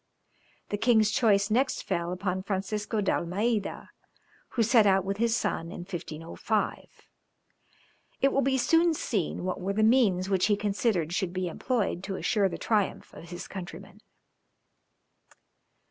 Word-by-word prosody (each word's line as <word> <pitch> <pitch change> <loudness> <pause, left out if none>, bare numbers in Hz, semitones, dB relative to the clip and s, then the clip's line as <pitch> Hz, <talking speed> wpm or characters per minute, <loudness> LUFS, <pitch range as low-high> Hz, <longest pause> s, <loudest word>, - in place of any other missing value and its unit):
The 205 - -2
king's 220 -3 +4
choice 205 -2 +3
next 260 +4 +1
fell 170 -2 -2
upon 185 0 -2
Francisco 205 +2 -2
d'Almeida, 200 +3 -1 0.6
who 235 - +2
set 225 -1 +5
out 190 -1 +3
with 195 +1 -2
his 230 +1 +2
son 165 -8 -2
in - - -7
1505. 175 +3 -3 1.3
It 275 0 +3
will 275 - +3
be 265 0 +2
soon 330 +5 +3
seen 200 - -2
what 185 0 -3
were 195 +2 -1
the 215 +2 +1
means 215 -6 +3
which 190 -1 +2
he 210 - +3
considered 200 - 0
should 180 -1 -1
be 185 -1 -2
employed 195 -1 -1
to 195 -1 -4
assure 200 0 +1
the - - -5
triumph 210 -4 -1
of 170 - -11
his 175 0 -7
countrymen. 190 +2 -9
200 Hz, 145 wpm, -28 LUFS, 185-225 Hz, 1.3 s, set